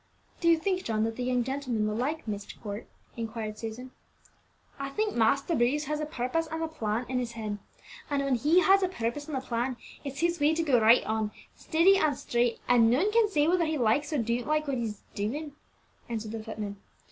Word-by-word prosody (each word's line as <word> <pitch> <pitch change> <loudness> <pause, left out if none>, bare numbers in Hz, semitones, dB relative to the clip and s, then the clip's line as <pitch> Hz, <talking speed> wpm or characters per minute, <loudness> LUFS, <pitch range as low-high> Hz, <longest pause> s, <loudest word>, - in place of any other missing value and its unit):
"Do 340 - 0
you 335 - +6
think, 370 +2 -1
John, 220 -1 0
that 225 0 -1
the 250 - -3
young 250 -1 +1
gentlemen 255 -4 -1
will 210 - -1
like 285 +5 -2
Myst 205 -1 -5
Court?" 205 0 -6 0.3
inquired 220 -2 -5
Susan. 235 +3 -6 0.9
"I 275 0 -3
think 425 +9 -1
Master 275 +8 +2
Bruce 280 +2 +2
has 300 +1 -2
a 305 - -2
purpose 305 +4 -1
and 320 +1 -3
a - - 0
plan 240 -7 -2
in 255 0 -1
his 240 -1 -3
head; 215 -3 -4 0.5
and 285 -1 0
when 275 -1 +1
he 300 +9 +4
has 390 +1 +5
a 375 - +2
purpose 290 -3 -3
and 300 -4 -3
a - - -2
plan, 245 0 -2 0.3
it's 275 0 -5
his 340 0 +1
way 295 +2 +3
to 330 - +1
go 260 -7 +3
right 225 +3 +6
on, 220 -1 0 0.3
steady 365 +5 +4
and 295 -5 +2
straight, 240 0 0
and 235 -2 +5
none 320 - +3
can 450 -1 +4
say 300 -6 +2
whether 345 0 +3
he 310 0 0
likes 275 +5 +2
or 300 - +1
don't 235 0 -1
like 305 0 +1
what 275 -2 0
he's 215 -3 -4
a - - -32
doing," 285 +10 -3 0.6
answered 220 -2 -4
the 225 -1 -5
footman. 210 -2 -5
255 Hz, 220 wpm, -29 LUFS, 225-310 Hz, 0.9 s, you